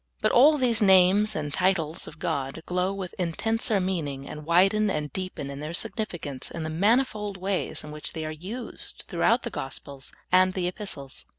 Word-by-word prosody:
But - - +2
all 295 +5 +7
these 245 -4 +2
names 195 +2 +5
and 150 -2 -3
titles 175 -2 0
of 150 - -10
God 140 +1 -3
glow 180 +1 0
with 195 -2 -5
intenser 215 +5 0
meaning, 155 -8 -2
and 150 0 -8
widen 195 +5 +4
and 150 -4 -2
deepen 185 -7 -4
in 140 - -7
their 155 +3 -4
significance 170 - -3
in 165 - -5
the 155 - -3
manifold 210 +2 +1
ways 190 0 -2
in 150 - -8
which 150 0 -4
they 160 -1 -4
are 155 - -3
used 190 +11 -5
throughout - - +2
the - - -4
Gospels 135 0 -6 0.2
and 185 0 +5
the 180 -2 0
Epistles. 170 -8 -7
180 Hz, 180 wpm, -26 LUFS, 155-200 Hz, 0.2 s, all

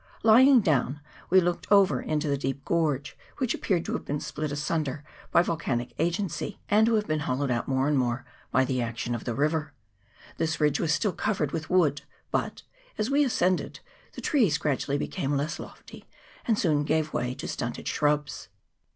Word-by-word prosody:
Lying 245 +4 +7
down, 145 -5 +1 0.3
we 190 - +6
looked 175 +1 -2
over 200 -1 +5
into 155 0 -1
the 140 - +1
deep 135 0 -4
gorge, 150 -4 0 0.2
which 255 -4 0
appeared 175 -4 -1
to - - -3
have - - -3
been 145 +1 -3
split 150 0 -4
asunder 145 -1 -2 0.3
by 170 - +4
vol 170 - -1
canic 120 -5 -2
agency, 175 +4 -2
and 215 +2 +5
to 230 - +3
have 210 -1 +1
been 155 -4 -1
hollowed 135 -1 -1
out 120 -1 -1
more 130 0 +1
and 145 -2 +2
more 125 0 -1 0.2
by 130 +1 +3
the 130 -1 -1
action 120 +1 -3
of 120 - -5
the 120 - -2
river. 150 +1 0 0.6
This 160 0 -1
ridge 150 -2 +2
was 160 - +1
still 180 +5 +1
covered 160 -7 -1
with 160 -1 -4
wood; 155 -6 +3 0.3
but, - - -2 0.3
as 215 +5 -1
we 290 +1 +4
ascended, 185 -8 0 0.3
the - - -8
trees 220 - +2
gradually 140 -1 -1
became 145 -2 -2
less 145 +4 -2
lofty, - - -11 0.4
and 225 -3 +2
soon 150 -6 +2
gave 155 +1 0
way 125 +1 -1
to - - -6
stunted 120 -1 -4
shrubs. 150 -1 0
150 Hz, 185 wpm, -27 LUFS, 140-180 Hz, 0.6 s, Lying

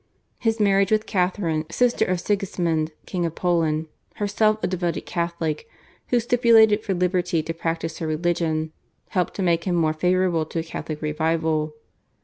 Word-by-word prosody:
His 225 -1 0
marriage 195 -1 +3
with 215 0 +2
Catharine, 180 -4 0
sister 245 +7 +2
of 185 -1 0
Sigismund, 175 -5 -1
King 180 -2 -2
of 165 -1 -2
Poland, 165 -3 +1 0.3
herself 215 +1 +2
a - - +3
devoted 175 -2 -2
Catholic, 170 0 -2 0.4
who 245 - +3
stipulated 225 -3 +4
for 195 - -1
liberty 180 -2 +1
to 165 - -4
practice 165 -1 -3
her 160 - -3
religion, 160 -1 0 0.4
helped 180 -2 -1
to 195 - -2
make 170 -2 +1
him 180 -2 +1
more 160 -2 +2
favourable 180 -1 +1
to - - -6
a 165 - 0
Catholic 155 -1 -6
revival. 155 0 0
175 Hz, 155 wpm, -23 LUFS, 160-195 Hz, 0.4 s, stipulated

